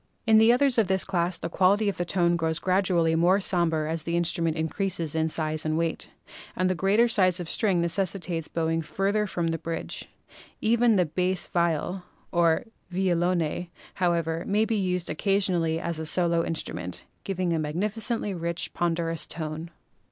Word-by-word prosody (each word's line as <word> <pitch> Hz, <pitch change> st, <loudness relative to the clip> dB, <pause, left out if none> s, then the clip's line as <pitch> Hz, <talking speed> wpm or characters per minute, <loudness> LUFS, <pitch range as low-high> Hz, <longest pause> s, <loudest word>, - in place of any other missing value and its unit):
In 220 Hz, -1 st, +6 dB
the 225 Hz, +1 st, +6 dB
others 255 Hz, 0 st, +3 dB
of 215 Hz, -, +3 dB
this 190 Hz, 0 st, +1 dB
class 175 Hz, -2 st, -1 dB
the -, -, -4 dB
quality 195 Hz, +5 st, +2 dB
of 200 Hz, -, 0 dB
tone 175 Hz, -1 st, +1 dB
grows 160 Hz, -1 st, 0 dB
gradually 180 Hz, -3 st, +2 dB
more 175 Hz, +4 st, +4 dB
somber 170 Hz, -5 st, +1 dB
as 160 Hz, +1 st, -2 dB
the 170 Hz, +2 st, -1 dB
instruments 170 Hz, -2 st, 0 dB
increase 190 Hz, +4 st, -2 dB
in 160 Hz, 0 st, -1 dB
size 155 Hz, -1 st, -2 dB
and 155 Hz, 0 st, -1 dB
weight, 165 Hz, -1 st, -2 dB, 0.5 s
and 185 Hz, -, +1 dB
the 185 Hz, -, +2 dB
greater 200 Hz, +6 st, +3 dB
size 185 Hz, -5 st, +3 dB
of 175 Hz, -, -5 dB
string 195 Hz, -2 st, +2 dB
necessitates 170 Hz, -1 st, -1 dB
bowing 165 Hz, 0 st, -1 dB
farther 200 Hz, +6 st, -1 dB
from 170 Hz, -3 st, -2 dB
the 165 Hz, 0 st, -2 dB
bridge. 165 Hz, +1 st, -5 dB, 0.5 s
Even 230 Hz, 0 st, +3 dB
the 180 Hz, -2 st, +3 dB
bass 180 Hz, +3 st, -1 dB
viol 170 Hz, +2 st, -1 dB, 0.3 s
(or 170 Hz, -2 st, +3 dB, 0.3 s
violone), 175 Hz, -2 st, 0 dB, 0.3 s
however, 170 Hz, -2 st, 0 dB
may 210 Hz, +2 st, +2 dB
be 225 Hz, -, -1 dB
used 180 Hz, -3 st, -1 dB
occasionally 175 Hz, -2 st, +1 dB
as 170 Hz, -1 st, -3 dB
a 160 Hz, -, -4 dB
solo 170 Hz, 0 st, +2 dB
in 165 Hz, -, -2 dB
strument, 90 Hz, -, -4 dB, 0.2 s
giving 185 Hz, -3 st, -1 dB
a 165 Hz, -, 0 dB
magnificently 205 Hz, +7 st, -1 dB
rich, 170 Hz, -1 st, -2 dB
ponderous 165 Hz, -1 st, -1 dB
tone. 160 Hz, 0 st, -5 dB
175 Hz, 165 wpm, -26 LUFS, 165-195 Hz, 0.5 s, In